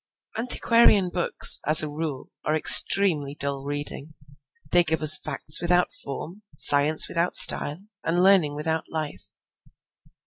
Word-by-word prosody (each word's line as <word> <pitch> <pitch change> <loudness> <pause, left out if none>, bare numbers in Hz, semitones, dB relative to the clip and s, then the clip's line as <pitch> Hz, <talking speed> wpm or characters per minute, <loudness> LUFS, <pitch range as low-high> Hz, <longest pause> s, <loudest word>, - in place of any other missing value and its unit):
Antiquarian 230 -4 +1
books, 175 0 +1
as 155 +1 +5
a - - -6
rule, 150 -2 -9
are 155 - -4
extremely 155 -3 +3
dull 140 -1 -7
reading. 145 +1 -9 0.6
They 175 0 +1
give 160 -1 -5
us 155 0 +8
facts 150 0 -4
without 175 +1 -2
form, 160 +8 -11
science 145 +2 +3
without 170 +1 -4
style, 155 +7 +2 0.2
and 175 +2 -3
learning 185 -7 0
without 160 +2 -6
life. 155 -2 -9
155 Hz, 130 wpm, -21 LUFS, 145-175 Hz, 0.6 s, us